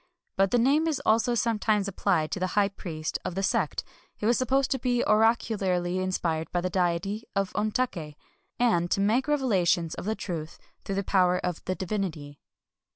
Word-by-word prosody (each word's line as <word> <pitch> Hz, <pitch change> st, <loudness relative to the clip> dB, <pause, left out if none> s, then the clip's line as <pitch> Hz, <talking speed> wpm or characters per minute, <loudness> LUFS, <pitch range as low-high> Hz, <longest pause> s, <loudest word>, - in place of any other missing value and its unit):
But 195 Hz, 0 st, +3 dB
the 245 Hz, -, +2 dB
name 280 Hz, +7 st, +3 dB
is 305 Hz, -4 st, 0 dB
also 230 Hz, +2 st, +3 dB
sometimes 215 Hz, -3 st, +1 dB
applied 185 Hz, -5 st, 0 dB
to -, -, -2 dB
the 185 Hz, -, 0 dB
high 200 Hz, -1 st, +4 dB
priest 160 Hz, -5 st, -5 dB
of 175 Hz, -, -4 dB
the 195 Hz, -, -1 dB
sect, -, -, 0 dB, 0.3 s
who 210 Hz, -, -2 dB
is 240 Hz, -, +4 dB
supposed 260 Hz, +2 st, +1 dB
to 265 Hz, -, +1 dB
be 245 Hz, -1 st, +1 dB
oracularly 200 Hz, -5 st, +2 dB
inspired 170 Hz, -4 st, -1 dB
by 175 Hz, -, 0 dB
the 185 Hz, +1 st, -2 dB
deity 185 Hz, +4 st, -1 dB
of 195 Hz, -1 st, 0 dB
Ontak^, 210 Hz, -8 st, -2 dB, 0.4 s
and 175 Hz, -8 st, +2 dB
to -, -, +1 dB
make 225 Hz, +7 st, +2 dB
revelations 190 Hz, -, +1 dB
of 220 Hz, +3 st, -3 dB
truth 165 Hz, -4 st, -5 dB, 0.3 s
through 195 Hz, -, -3 dB
the 200 Hz, -, -1 dB
power 180 Hz, -2 st, +3 dB
of 180 Hz, -2 st, -3 dB
the 185 Hz, -, -1 dB
divinity. 170 Hz, -8 st, -4 dB
195 Hz, 175 wpm, -27 LUFS, 175-230 Hz, 0.4 s, high